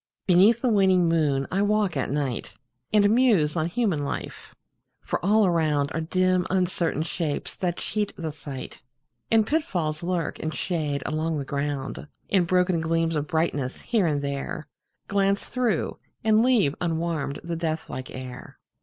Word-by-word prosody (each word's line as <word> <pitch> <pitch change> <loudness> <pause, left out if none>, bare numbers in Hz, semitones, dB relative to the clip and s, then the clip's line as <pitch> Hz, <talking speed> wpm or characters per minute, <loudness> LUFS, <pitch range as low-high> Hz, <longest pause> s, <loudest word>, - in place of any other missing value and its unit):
Beneath 200 +6 +5
the 255 - +3
waning 190 -5 +4
moon 150 -5 +2
I 195 - +1
walk 205 -3 +1
at 135 - -1
night, 140 -4 -2 0.4
And 205 -1 +5
muse 215 -11 +3
on 160 -1 +1
human 175 -6 0
life 140 - -6 0.4
for - - -3
all 210 +3 +4
around 155 -5 +1
Are 165 - -2
dim 185 +2 +1
uncertain 180 -4 0
shapes 160 -3 -3
that 175 -2 -1
cheat 210 -1 -2
the 160 -3 -4
sight, 145 -3 -8 0.5
And 225 -1 +4
pitfalls 175 - -1
lurk 175 -2 -2
in 155 - -2
shade 150 -5 -2
along 155 +1 -1
the 140 - -3
ground, 140 0 -3 0.2
And 185 -3 +3
broken 180 -1 +2
gleams 165 0 0
of 150 0 -1
brightness, 160 -6 -1
here 220 -7 +1
and 145 -2 0
there, 140 +3 -4 0.4
Glance 200 0 +1
through, 240 -8 -1 0.2
and 220 0 +4
leave 230 - +3
unwarmed 165 -4 -1
the 170 0 -3
death 160 -1 -2
like 130 0 -6
air. 130 -1 -9
165 Hz, 155 wpm, -25 LUFS, 150-195 Hz, 0.5 s, Beneath